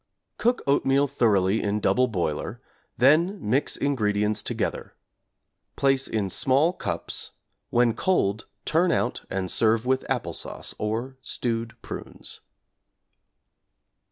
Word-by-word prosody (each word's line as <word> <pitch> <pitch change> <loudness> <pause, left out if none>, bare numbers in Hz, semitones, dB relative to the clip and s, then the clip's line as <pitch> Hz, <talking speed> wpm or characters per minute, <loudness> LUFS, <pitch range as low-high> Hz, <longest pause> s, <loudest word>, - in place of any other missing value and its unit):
Cook 245 +2 +1
oatmeal 140 0 +3
thoroughly 110 -7 +2
in 105 +1 0
double 125 +4 +3
boiler, 85 -9 -2 0.4
then 160 +10 +4
mix 130 +4 0
ingredients 105 -6 +1
together; - - -3 0.8
place 135 -1 +2
in 105 -4 -1
small 140 +7 +2
cups, - - -4 0.4
when 120 -1 +3
cold 110 - 0 0.2
turn 170 +3 +3
out 120 - 0
and 95 -1 -1
serve 110 +1 +2
with 130 +1 0
apple - - -1
sauce, - - -6
or 115 +5 -2
stewed 115 -2 -3
prunes. - - -6
120 Hz, 110 wpm, -26 LUFS, 105-140 Hz, 0.8 s, then